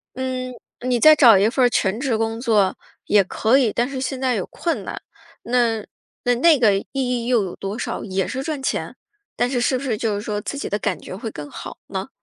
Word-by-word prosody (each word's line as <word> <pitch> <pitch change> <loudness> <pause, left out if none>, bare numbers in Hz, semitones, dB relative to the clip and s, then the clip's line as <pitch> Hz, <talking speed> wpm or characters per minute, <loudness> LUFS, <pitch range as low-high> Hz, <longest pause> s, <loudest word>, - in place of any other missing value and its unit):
嗯， 255 0 -3 0.3
你 245 -1 +2
再 310 +5 +8
找 240 -9 +7
一 200 - +4
份 255 +1 +2
儿 - - +4
全 200 -3 0
职 255 -4 0
工 225 0 -2
作 215 -6 +2 0.3
也 205 -1 +4
可 220 +6 +2
以， 250 -6 +2
但 240 +3 0
是 265 -2 -4
现 265 0 -3
在 255 -2 +1
有 195 - -2
困 335 - -3
难， - - -6 0.4
那 235 -3 +1 0.5
那 305 +4 +5
个 215 -5 +4
意 195 - -4
义 250 -3 -1
又 240 -4 +3
有 185 - -6
多 200 +4 -5
少？ - - -3
也 190 -2 -1
是 265 +1 -4
赚 300 -2 -3
钱？ - - -2 0.4
但 245 - +1
是 250 -2 0
是 255 +1 +2
不 255 - -6
是 240 -6 -1
就 220 -1 -1
是 205 - -3
说 210 -1 -3
自 280 - -5
己 - - -4
的 205 - 0
感 - - -2
觉 - - -8
会 220 +2 -6
更 145 -1 -8
好 - - -8
呢？ 190 0 -5
235 Hz, 250 characters per minute, -21 LUFS, 210-260 Hz, 0.5 s, 再